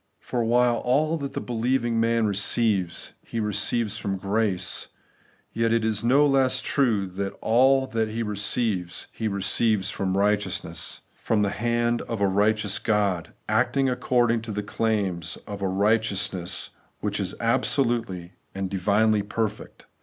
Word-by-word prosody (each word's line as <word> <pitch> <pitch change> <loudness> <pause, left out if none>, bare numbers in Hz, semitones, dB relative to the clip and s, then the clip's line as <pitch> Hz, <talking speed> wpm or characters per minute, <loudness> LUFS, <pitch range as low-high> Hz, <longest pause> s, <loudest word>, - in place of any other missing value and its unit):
For 120 -2 -2
while 120 +1 +3
aU 150 +6 +2
that 140 -3 -5
the - - -2
believing 120 0 0
man 115 0 +2
receives, 100 -2 0
he 115 - -5
receives 105 +1 0
from 95 -1 -2
grace; 100 -1 -1 0.7
yet 115 0 +1
it 115 -1 +2
is 110 0 0
no 135 +5 +5
less 135 -2 +3
true 115 -8 +1
that 95 +1 -4
all 130 +4 +4
that 115 -4 -1
he 115 +2 -2
receives, 105 -3 -1
he 110 - -3
receives 100 +1 +1
from 95 -1 -1
RIGHTEOUSNESS; 105 +1 -1
from 105 -2 0
the 100 - 0
hand 120 +1 0
of 115 - -5
a 100 - +3
righteous 105 0 +1
God, 100 -6 0
acting 125 +5 +2
according 120 -2 +1
to 115 -1 -6
the 105 0 -3
claims 100 -6 -1
of 100 -1 -7
a 95 - 0
righteousness 100 -2 0 0.3
which 105 -1 -2
is 95 -2 -3
absolutely 115 -7 0 0.2
and 95 -1 -3
divinely 105 +3 +2
perfect. 105 +1 -4
110 Hz, 145 wpm, -25 LUFS, 100-120 Hz, 0.7 s, no